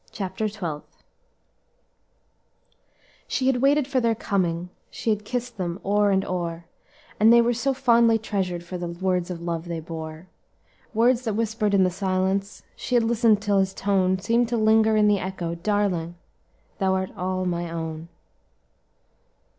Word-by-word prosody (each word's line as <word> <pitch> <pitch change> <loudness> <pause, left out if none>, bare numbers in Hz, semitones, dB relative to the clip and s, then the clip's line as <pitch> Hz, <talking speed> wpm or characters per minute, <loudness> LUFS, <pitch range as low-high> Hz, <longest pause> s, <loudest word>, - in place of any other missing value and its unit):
CHAPTER 195 +2 -3
TWELFTH 170 -8 -7 2.2
"She 260 - -1
had 265 -1 +3
waited 280 0 +3
for 270 -2 +1
their 230 -2 +1
coming, 180 -5 -1 0.2
She 225 - -2
had 210 -1 -1
kiss'd 245 +2 -4
them 175 0 -3
o'er 205 +1 +3
and 190 -1 +1
o'er 170 -2 -4 0.5
And 220 +2 +6
they 235 - +7
were 235 +1 +3
so 240 +4 0
fondly 235 -3 +4
treasured 190 -5 -3
For 180 +1 -6
the 175 - -3
words 180 +1 -1
of 170 -2 -6
love 170 -1 -3
they 170 -1 -4
bore, 160 +1 -8 0.7
Words 240 +2 +3
that 220 -3 -1
whispered 215 -2 0
in 190 - +5
the 185 - +2
silence, 190 +1 -1
She 250 - -3
had 240 - +4
listened 225 -2 +3
till 205 -2 +2
his 190 0 0
tone 190 -2 +1
Seemed 230 +5 +1
to 240 - 0
linger 220 0 +4
in 210 0 +4
the 205 -1 +3
echo 180 -3 -4
'Darling, 175 -2 -1 0.6
thou 190 -1 +2
art 190 0 -3
all 185 0 -2
mine 175 -1 -2
own!'" 160 -1 -5
195 Hz, 160 wpm, -24 LUFS, 175-225 Hz, 2.2 s, they